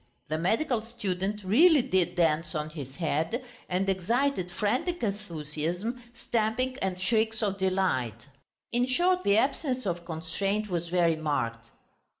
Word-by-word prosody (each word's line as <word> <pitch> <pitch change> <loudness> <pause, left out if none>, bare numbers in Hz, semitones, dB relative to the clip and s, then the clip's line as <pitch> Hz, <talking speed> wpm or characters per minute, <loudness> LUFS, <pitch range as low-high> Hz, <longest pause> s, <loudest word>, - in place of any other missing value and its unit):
The 155 - 0
medical 225 - +1
student 210 -3 -3
really 290 - +6
did 185 -8 +1
dance 160 -2 +1
on 150 0 -2
his 140 -4 -8
head, 165 - -1 0.2
and 185 +2 0
excited 195 +2 +1
frantic 255 - -1
enthusiasm, 180 - -3
stamping, 235 +4 0
and 185 -1 -1
shrieks 220 +3 +1
of 200 -1 -1
delight. 180 - 0 0.5
In 245 +2 +2
short, 360 +8 +2
the 200 +1 +4
absence 260 -1 0
of 175 -2 -2
constraint 195 +6 -2
was 170 -1 -2
very 170 -2 +3
marked. 115 -7 -2
190 Hz, 135 wpm, -28 LUFS, 165-235 Hz, 0.5 s, really